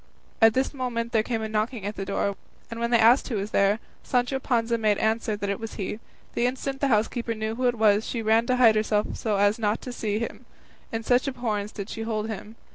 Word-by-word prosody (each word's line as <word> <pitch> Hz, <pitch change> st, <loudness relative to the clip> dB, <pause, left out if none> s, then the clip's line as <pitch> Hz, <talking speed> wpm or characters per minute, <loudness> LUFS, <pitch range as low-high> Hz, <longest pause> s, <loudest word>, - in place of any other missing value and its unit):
At 225 Hz, -1 st, +6 dB
this 265 Hz, +2 st, +1 dB
moment 240 Hz, -3 st, -3 dB
there 225 Hz, -3 st, +3 dB
came 225 Hz, 0 st, -2 dB
a -, -, -2 dB
knocking 215 Hz, 0 st, -2 dB
at 205 Hz, +1 st, -3 dB
the 195 Hz, -, -4 dB
door, 200 Hz, 0 st, -1 dB, 0.4 s
and 230 Hz, -, -5 dB
when 235 Hz, 0 st, 0 dB
they 235 Hz, -, +5 dB
asked 230 Hz, +4 st, +5 dB
who 245 Hz, -, -3 dB
was 205 Hz, +1 st, -3 dB
there, 200 Hz, +1 st, +3 dB, 0.2 s
Sancho 250 Hz, +1 st, 0 dB
Panza 235 Hz, -3 st, 0 dB
made 210 Hz, -2 st, +2 dB
answer 220 Hz, 0 st, 0 dB
that 205 Hz, -1 st, -4 dB
it 200 Hz, -, -3 dB
was 225 Hz, -1 st, -6 dB
he. 210 Hz, +2 st, -4 dB, 0.3 s
The 240 Hz, -, +2 dB
instant 270 Hz, +2 st, -4 dB
the 280 Hz, -, +3 dB
housekeeper 230 Hz, 0 st, 0 dB
knew 220 Hz, 0 st, -3 dB
who 250 Hz, +2 st, 0 dB
it 245 Hz, -, +1 dB
was, 215 Hz, -1 st, +4 dB
she 230 Hz, -1 st, -3 dB
ran 225 Hz, +2 st, +3 dB
to 255 Hz, -, +2 dB
hide 240 Hz, -3 st, +6 dB
herself 215 Hz, -1 st, 0 dB
so 215 Hz, -3 st, -1 dB
as 205 Hz, +3 st, +3 dB
not 215 Hz, 0 st, +1 dB
to 250 Hz, -, -6 dB
see 210 Hz, -3 st, -2 dB
him; 230 Hz, +1 st, -5 dB, 0.4 s
in 225 Hz, 0 st, -3 dB
such 245 Hz, +3 st, +2 dB
abhorrence 220 Hz, -6 st, -2 dB
did 200 Hz, -2 st, -6 dB
she 225 Hz, -, -6 dB
hold 220 Hz, -1 st, -2 dB
him. 220 Hz, +1 st, -7 dB
225 Hz, 240 wpm, -26 LUFS, 215-240 Hz, 0.4 s, At